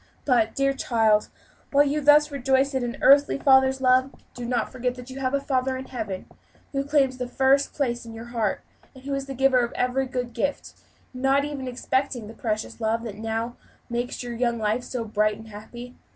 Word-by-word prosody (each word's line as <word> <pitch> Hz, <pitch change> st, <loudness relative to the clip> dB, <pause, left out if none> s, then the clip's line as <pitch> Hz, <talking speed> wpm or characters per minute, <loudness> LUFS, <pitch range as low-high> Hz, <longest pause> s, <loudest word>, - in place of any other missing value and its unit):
But, 235 Hz, -5 st, +2 dB
dear 275 Hz, 0 st, +2 dB
child, 225 Hz, -5 st, +2 dB, 0.4 s
while 285 Hz, 0 st, +5 dB
you 290 Hz, +1 st, 0 dB
thus 295 Hz, +1 st, +5 dB
rejoice 270 Hz, 0 st, +1 dB
in 260 Hz, -1 st, 0 dB
an 240 Hz, -1 st, -4 dB
earthly 280 Hz, +1 st, +6 dB
father's 265 Hz, -1 st, +4 dB
love, 255 Hz, +1 st, +4 dB, 0.2 s
do 245 Hz, -, -7 dB
not 240 Hz, -2 st, -1 dB
forget 250 Hz, -1 st, -2 dB
that 250 Hz, +1 st, -10 dB
you 265 Hz, -, -7 dB
have 265 Hz, 0 st, 0 dB
a -, -, +1 dB
Father 265 Hz, -1 st, -1 dB
in 260 Hz, -, -7 dB
Heaven, 215 Hz, -8 st, -5 dB, 0.5 s
who 275 Hz, -1 st, -1 dB
claims 275 Hz, -3 st, +2 dB
the 250 Hz, -, -2 dB
first 270 Hz, +2 st, +2 dB
place 240 Hz, -4 st, -1 dB
in 230 Hz, -, -10 dB
your 225 Hz, +1 st, -8 dB
heart; 220 Hz, -4 st, 0 dB, 0.3 s
and 260 Hz, -, -14 dB
who 280 Hz, +1 st, -4 dB
is 275 Hz, 0 st, -3 dB
the 270 Hz, -, -6 dB
giver 265 Hz, 0 st, +4 dB
of 235 Hz, -1 st, 0 dB
every 255 Hz, +1 st, 0 dB
good 250 Hz, -2 st, -4 dB
gift, 280 Hz, +5 st, -2 dB, 0.4 s
not 270 Hz, +2 st, +2 dB
even 280 Hz, -3 st, -5 dB
excepting 255 Hz, -1 st, -1 dB
the 220 Hz, -, -10 dB
precious 220 Hz, 0 st, -4 dB
love 225 Hz, +1 st, 0 dB
that 215 Hz, -4 st, -6 dB
now 225 Hz, +2 st, -3 dB, 0.3 s
makes 240 Hz, +1 st, -3 dB
your 240 Hz, -1 st, -5 dB
young 235 Hz, 0 st, 0 dB
life 220 Hz, +2 st, 0 dB
so 245 Hz, -2 st, -4 dB
bright 215 Hz, -1 st, +1 dB
and 220 Hz, 0 st, -12 dB
happy. 240 Hz, +4 st, -10 dB
255 Hz, 205 wpm, -25 LUFS, 235-270 Hz, 0.5 s, earthly